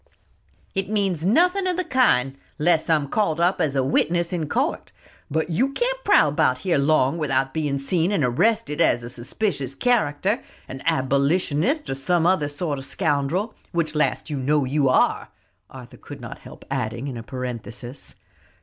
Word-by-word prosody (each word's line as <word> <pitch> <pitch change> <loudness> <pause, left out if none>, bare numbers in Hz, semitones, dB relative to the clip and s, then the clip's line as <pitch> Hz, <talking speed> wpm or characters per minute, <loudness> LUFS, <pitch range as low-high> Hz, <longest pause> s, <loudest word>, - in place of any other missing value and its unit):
"It 195 0 -2
means 195 -6 0
nothing 360 - +3
of 360 -1 -1
the 365 - 0
kind, 190 - +2 0.2
unless 160 +1 +2
I'm 150 -3 +2
called 165 -1 0
up 180 +2 +2
as 140 -3 0
a 135 - +2
witness 170 +6 +1
in 160 -4 -2
court; - - -1 0.4
but 160 +3 -1
you 260 +12 +1
can't - - -1
prowl - - +5
about - - +1
here 180 -6 +1
long 145 +1 +2
without 135 -3 0
being 145 -3 -1
seen 165 +6 0
and 195 -8 +1
arrested 165 - +1
as 120 -7 +3
a 120 - -7
suspicious 135 - -3
character, 205 - +1 0.3
an 135 0 -8
abolitionist, 155 - +1
or - - -2
some 160 +5 +1
other 175 -5 +2
sort 145 0 -3
of 135 - -6
scoundrel 160 +9 -1 0.2
which 165 -3 -1
last 150 - 0
you 150 -3 -3
know 145 +2 +1
you 135 +1 +1
are," - - +2 0.4
Arthur - - -12
could - - -10
not - - -8
help - - -13
adding 120 0 -2
in 135 - -5
a 115 - -6
parenthesis. 125 +1 -7
155 Hz, 170 wpm, -23 LUFS, 135-190 Hz, 0.4 s, prowl